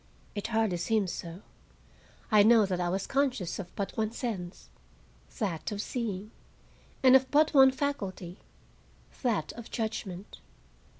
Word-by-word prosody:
It 205 Hz, -, -4 dB
hardly 220 Hz, -5 st, +1 dB
seems 200 Hz, +1 st, 0 dB
so. 170 Hz, +3 st, -7 dB, 0.9 s
I 210 Hz, -1 st, +7 dB
know 220 Hz, 0 st, +6 dB
that 185 Hz, -2 st, -2 dB
I 175 Hz, -, 0 dB
was 190 Hz, +2 st, -1 dB
conscious 260 Hz, -11 st, -1 dB
of 190 Hz, -, -5 dB
but 195 Hz, -1 st, -4 dB
one 220 Hz, -1 st, -1 dB
sense, 205 Hz, -8 st, -5 dB, 0.7 s
that 195 Hz, -8 st, -2 dB
of 205 Hz, -, -4 dB
seeing; 215 Hz, -3 st, -4 dB, 0.7 s
and 260 Hz, 0 st, +8 dB
of 260 Hz, 0 st, +4 dB
but 305 Hz, +2 st, +3 dB
one 265 Hz, -2 st, +8 dB
faculty, 205 Hz, -10 st, -4 dB, 0.8 s
that 220 Hz, -, 0 dB
of 235 Hz, -1 st, -10 dB
judgment. 205 Hz, -4 st, -5 dB
215 Hz, 135 wpm, -29 LUFS, 185-245 Hz, 0.9 s, and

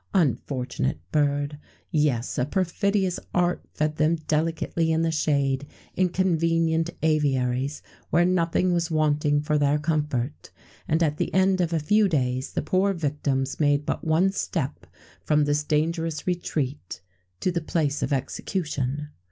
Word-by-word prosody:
Unfortunate 130 Hz, -, 0 dB
bird! 145 Hz, 0 st, 0 dB, 0.3 s
Yes, 150 Hz, -7 st, +1 dB
a 125 Hz, -, +2 dB
perfidious 190 Hz, +2 st, 0 dB, 0.2 s
art 180 Hz, 0 st, +1 dB
fed 150 Hz, 0 st, -1 dB
them 155 Hz, +2 st, +3 dB
delicately 160 Hz, +1 st, 0 dB
in 160 Hz, +1 st, +2 dB
the 165 Hz, -, +1 dB
shade, 140 Hz, -3 st, 0 dB, 0.3 s
in 185 Hz, 0 st, +2 dB
convenient 165 Hz, -2 st, +1 dB
aviaries, 140 Hz, -3 st, +1 dB, 0.3 s
where 175 Hz, +2 st, +4 dB
nothing 180 Hz, 0 st, +2 dB
was 170 Hz, -1 st, 0 dB
wanting 150 Hz, -2 st, +2 dB
for 150 Hz, 0 st, +1 dB
their 145 Hz, 0 st, +3 dB
comfort, 150 Hz, -4 st, -2 dB, 0.4 s
and 160 Hz, +2 st, +2 dB
at 150 Hz, -2 st, 0 dB
the -, -, -1 dB
end 190 Hz, 0 st, +3 dB
of 170 Hz, -1 st, 0 dB
a 165 Hz, -, +1 dB
few 205 Hz, +7 st, +3 dB
days 130 Hz, -4 st, -1 dB
the -, -, -1 dB
poor 190 Hz, +5 st, +2 dB
victims 145 Hz, -5 st, -1 dB
made 145 Hz, -1 st, +2 dB
but -, -, -2 dB
one 165 Hz, +4 st, +3 dB
step -, -, -3 dB, 0.4 s
from 150 Hz, -1 st, +3 dB
this 145 Hz, 0 st, +1 dB
dangerous 160 Hz, +1 st, -1 dB
retreat 150 Hz, -, -3 dB, 0.4 s
to 185 Hz, -, 0 dB
the 170 Hz, -1 st, -1 dB
place 150 Hz, -3 st, -1 dB
of -, -, -1 dB
execution. 145 Hz, 0 st, -2 dB
155 Hz, 145 wpm, -25 LUFS, 145-170 Hz, 0.4 s, where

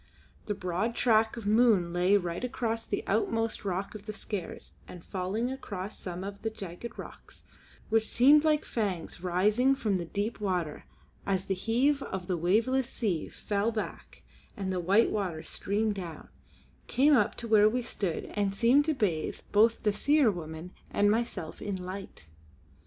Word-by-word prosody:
The 210 Hz, -, -1 dB
broad 190 Hz, +5 st, -2 dB
track 225 Hz, -2 st, +3 dB
of 230 Hz, -, -6 dB
the 205 Hz, -, +2 dB
moon 215 Hz, -7 st, +4 dB
lay 180 Hz, +3 st, +4 dB
right 175 Hz, +1 st, -3 dB
across 230 Hz, -2 st, -2 dB
the -, -, -2 dB
outmost 225 Hz, +2 st, 0 dB
rock 195 Hz, 0 st, -3 dB
of 210 Hz, 0 st, -10 dB
the 215 Hz, -, -4 dB
Skares 200 Hz, -4 st, -6 dB, 0.2 s
and 175 Hz, -2 st, -11 dB
falling 200 Hz, +7 st, -2 dB
across 205 Hz, -7 st, -6 dB
some 180 Hz, 0 st, -5 dB
of 200 Hz, 0 st, -7 dB
the 225 Hz, -, -1 dB
jagged 200 Hz, +1 st, -8 dB
rocks, -, -, -11 dB, 0.5 s
which 220 Hz, 0 st, +3 dB
seemed 285 Hz, +5 st, +6 dB
like 305 Hz, -1 st, +2 dB
fangs 190 Hz, -7 st, -3 dB
rising 210 Hz, +9 st, +3 dB
from 215 Hz, -7 st, 0 dB
the 175 Hz, -, -4 dB
deep 205 Hz, +7 st, -3 dB
water 180 Hz, -7 st, -2 dB, 0.4 s
as 190 Hz, -2 st, -1 dB
the 195 Hz, -, 0 dB
heave 250 Hz, +9 st, +1 dB
of 190 Hz, -7 st, -5 dB
the 180 Hz, -, -1 dB
waveless 230 Hz, +10 st, +1 dB
sea 195 Hz, -12 st, -2 dB
fell 205 Hz, +2 st, -1 dB
back 220 Hz, -2 st, -6 dB, 0.3 s
and 190 Hz, -2 st, -2 dB
the 180 Hz, -, -1 dB
white 195 Hz, +6 st, +3 dB
water 180 Hz, -7 st, -2 dB
streamed 210 Hz, +2 st, -1 dB
down, 175 Hz, -6 st, -7 dB, 0.6 s
came 285 Hz, +4 st, +4 dB
up -, -, +2 dB
to 235 Hz, -, -5 dB
where 215 Hz, -1 st, +6 dB
we 245 Hz, +2 st, -1 dB
stood 195 Hz, -7 st, -3 dB
and 200 Hz, -2 st, 0 dB
seemed 245 Hz, +7 st, +4 dB
to 315 Hz, -1 st, +1 dB
bathe 175 Hz, -10 st, -1 dB
both 225 Hz, +2 st, +4 dB
the 210 Hz, -, +2 dB
Seer 285 Hz, 0 st, +3 dB
woman 160 Hz, -1 st, -7 dB, 0.2 s
and 205 Hz, 0 st, +3 dB
myself 220 Hz, -8 st, -2 dB
in 205 Hz, -1 st, -3 dB
light. 185 Hz, -, -7 dB
205 Hz, 170 wpm, -29 LUFS, 185-230 Hz, 0.6 s, seemed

